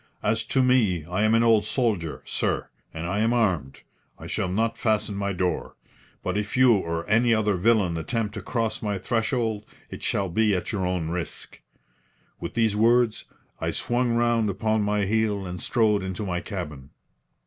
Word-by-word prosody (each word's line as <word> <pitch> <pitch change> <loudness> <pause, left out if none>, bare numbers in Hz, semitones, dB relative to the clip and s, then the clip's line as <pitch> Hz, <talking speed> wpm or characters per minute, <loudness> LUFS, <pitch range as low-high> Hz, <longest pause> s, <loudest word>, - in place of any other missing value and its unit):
As 110 0 +2
to 130 +3 +2
me, 110 -11 +2
I 90 +4 -2
am 110 +1 +4
an 115 - +4
old 115 -2 +4
soldier, 105 - -1
sir, - - -1 0.2
and 80 +1 -6
I 95 +4 -1
am 115 +2 +2
armed. 90 - 0 0.4
I - - -11
shall - - -2
not 115 +4 0
fasten 110 -2 0
my 100 0 -2
door. 90 -1 -2 0.5
But 95 +2 -1
if 105 +3 -4
you 130 -2 +6
or 85 -4 -2
any 115 +2 +4
other 105 -1 +1
villain 95 -2 +2
attempt 105 +5 -2
to - - -5
cross 115 -3 -2
my 105 -2 -1
threshold 110 +1 -1 0.3
it - - -7
shall 100 - 0
be 105 +3 +2
at 90 - -3
your 95 -4 -1
own 90 -3 -1
risk." 85 -2 -6 0.8
With - - -6
these 110 -3 +2
words, 115 +1 +3 0.3
I - - -1
swung 120 0 0
round 120 -2 +2
upon 110 +2 0
my 105 0 +1
heel 105 -1 0
and 90 0 -5
strode 110 -3 +2
into 95 +2 -4
my 90 -2 -1
cabin. 75 -9 -6
105 Hz, 180 wpm, -25 LUFS, 90-115 Hz, 0.8 s, you